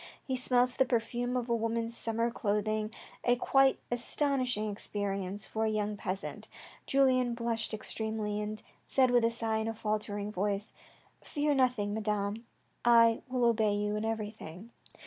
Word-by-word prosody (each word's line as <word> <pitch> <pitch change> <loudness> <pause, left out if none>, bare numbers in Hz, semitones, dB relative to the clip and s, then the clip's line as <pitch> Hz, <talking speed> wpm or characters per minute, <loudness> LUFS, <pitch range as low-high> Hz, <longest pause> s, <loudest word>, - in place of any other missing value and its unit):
He 260 - -2
smelt 250 0 +2
the 265 - +6
perfume 245 +1 0
of 245 -1 -2
a 235 - +2
woman's 230 0 -1
summer 230 0 0
clothing, 215 0 0 0.3
a 245 - +4
quite 270 +2 +4
astonishing 245 -3 0
experience 200 -1 -3
for 220 0 -1
a - - +1
poor 210 0 -1
peasant. 195 -1 -4 0.4
Julien 255 -3 +3
blushed 235 -1 -1
extremely, 215 -1 -3
and 215 0 -5 0.2
said 260 -2 +3
with 245 -1 +4
a 230 - +4
sigh 225 -1 -1
in 220 0 -1
a 225 - -2
faltering 210 -1 -2
voice: 205 +1 -2 0.3
" - - -34
Fear 295 0 0
nothing, 250 -6 +2
Madame, 210 +1 -2 0.4
I 230 -1 +6
will 250 -1 +1
obey 220 -3 +3
you 210 0 -1
in 210 - -2
everything." 215 -2 -5
225 Hz, 155 wpm, -31 LUFS, 210-245 Hz, 0.4 s, the